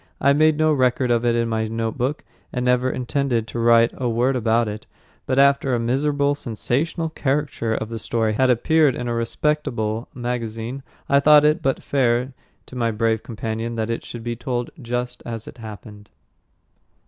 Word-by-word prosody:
I 140 +1 +4
made 155 +1 +4
no 155 0 +3
record 130 -2 +1
of 120 0 +2
it 120 -1 +3
in 115 0 +1
my 110 -1 -1
notebook 115 +5 -2 0.3
and 125 -1 -2
never 125 +1 +2
intended 125 -2 -1
to 120 - -4
write 115 0 +5
a 125 -2 -2
word 120 +4 +1
about 115 -1 +2
it; 105 +1 -6 0.4
but 130 - 0
after 140 -2 +4
a - - 0
miserable, 140 +4 +1
sensational 145 +6 -2
caricature 140 -6 -1
of 110 - -4
the 115 -1 -5
story 110 0 0
had 130 +4 +2
appeared 145 +3 +3
in 125 - -4
a 120 - -1
respectable 115 -2 -1
magazine, 120 0 -4 0.3
I 140 - +4
thought 150 +1 +6
it 150 +1 +3
but 135 -1 -1
fair 125 -1 +1 0.3
to - - -12
my 115 -2 0
brave 110 0 0
companion 115 0 -4
that 110 0 -2
it 115 - -3
should 120 -1 -8
be 120 0 -3
told 120 0 -3
just 125 +1 -3
as 115 -2 -6
it - - -11
happened. 105 -1 -10
120 Hz, 180 wpm, -22 LUFS, 115-135 Hz, 0.4 s, thought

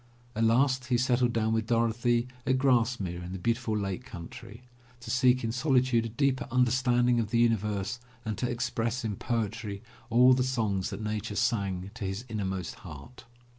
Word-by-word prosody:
At 115 +1 +2
last 130 +3 +3
he 125 -1 +2
settled 125 0 +2
down 110 -1 0
with 110 -1 0
Dorothy 120 +1 +1 0.2
at 130 0 +3
Grasmere 120 -9 +1
in 90 +1 -6
the - - -4
beautiful 115 +2 -1
Lake 100 +3 -3
Country, 115 +4 -10 0.4
to 120 -1 -6
seek 130 0 +3
in 115 - -1
solitude 125 -2 +2
a - - -8
deeper 130 +3 0
understanding 125 -1 +3
of 110 -2 -1
the 120 - +1
universe 105 -1 +1 0.3
and 110 -1 -2
to 125 - -1
express 120 0 -2
in 105 -2 -2
poetry 110 -2 -3 0.3
all 125 +2 +6
the 130 - +2
songs 110 -7 0
that 110 - -6
Nature 105 -1 -3
sang 100 -6 -1
to 110 -1 -7
his 95 +5 -4
inmost 95 -5 -4
heart. 75 - -11
115 Hz, 170 wpm, -29 LUFS, 105-125 Hz, 0.4 s, all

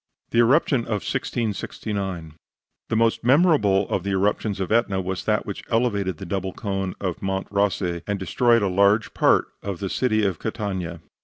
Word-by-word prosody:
THE 115 - +2
ERUPTION 135 +3 +4
OF 105 -3 -3
1669 100 -6 -3 0.6
The - - 0
most 115 0 +2
memorable 130 - +4
of - - 0
the 100 - -3
eruptions 100 +1 0
of 95 0 -3
Etna 110 -4 +2
was 95 0 -4
that 105 -1 +1
which 100 - -5
elevated 100 -7 0
the 95 - -7
double 95 0 -3
cone 95 -2 -3
of 90 -4 -3
Monte 95 0 -2
Rossi 95 -4 0
and 105 -1 -1
destroyed 115 +4 +2
a - - +2
large 100 +4 +3
part - - +3
of 100 -2 -4
the 95 +1 -4
city 110 -4 +1
of 95 -5 -1
Catania. 95 -7 -4
100 Hz, 170 wpm, -23 LUFS, 95-115 Hz, 0.6 s, ERUPTION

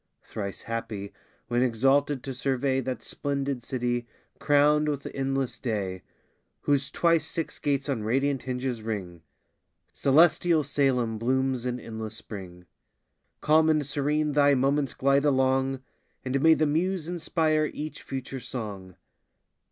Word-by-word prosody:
Thrice 100 -2 -6
happy, 115 -3 -5 0.3
when 120 0 +1
exalted 135 +3 +2
to 135 - -4
survey 130 +1 0
That 125 -2 -4
splendid 140 -3 -3
city, 120 -1 -2 0.3
crown'd 150 +1 +4
with 140 -2 -3
endless 135 -1 -2
day, 100 -6 -3 0.6
Whose 140 -1 +1
twice 170 -2 +2
six 165 - -4
gates 140 -1 0
on 135 -6 -1
radiant 135 +5 0
hinges 125 -2 -3
ring: 95 -6 -5 0.7
Celestial 160 +3 +4
Salem 130 -6 +1
blooms 130 +1 0
in 125 0 -2
endless 110 -1 -6
spring. 90 -5 -9 0.8
Calm 155 +1 +4
and 155 -2 +2
serene 150 +2 0
thy 145 -1 +4
moments 135 +1 +1
glide 140 +1 +3
along, 130 -1 +2 0.4
And 130 +1 0
may 160 +1 +6
the 155 - +2
muse 165 +3 0
inspire 160 -3 +1
each 155 +1 -6
future 135 0 -5
song! 105 -7 -6
135 Hz, 130 wpm, -27 LUFS, 120-145 Hz, 0.8 s, may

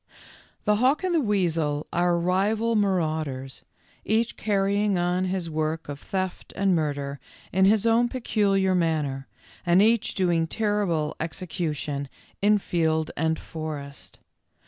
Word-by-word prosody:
The 210 -1 +3
hawk 260 - +2
and 370 -1 0
the 335 - +4
weasel 165 - 0
are 175 0 +2
rival 205 +6 +1
maraud 170 -7 +1
ers, 130 0 -7 0.4
each 225 +3 0
carrying 200 -1 +1
on 180 +1 +1
his 185 -2 -2
work 155 0 -2
of 145 -1 -6
theft 185 +1 -4
and 195 -2 +2
murder 145 -3 -2 0.3
in 190 +1 +4
his 210 +2 +4
own 230 +1 +3
peculiar 200 -6 +1
manner, 150 -6 0 0.4
and 175 0 +4
each 225 +2 +3
doing 170 -3 +1
terrible 195 -7 0
execution 155 -4 -3 0.3
in 210 +1 +5
field 160 -5 0
and 160 +1 0
forest. 150 -3 -7
180 Hz, 130 wpm, -25 LUFS, 155-205 Hz, 0.4 s, in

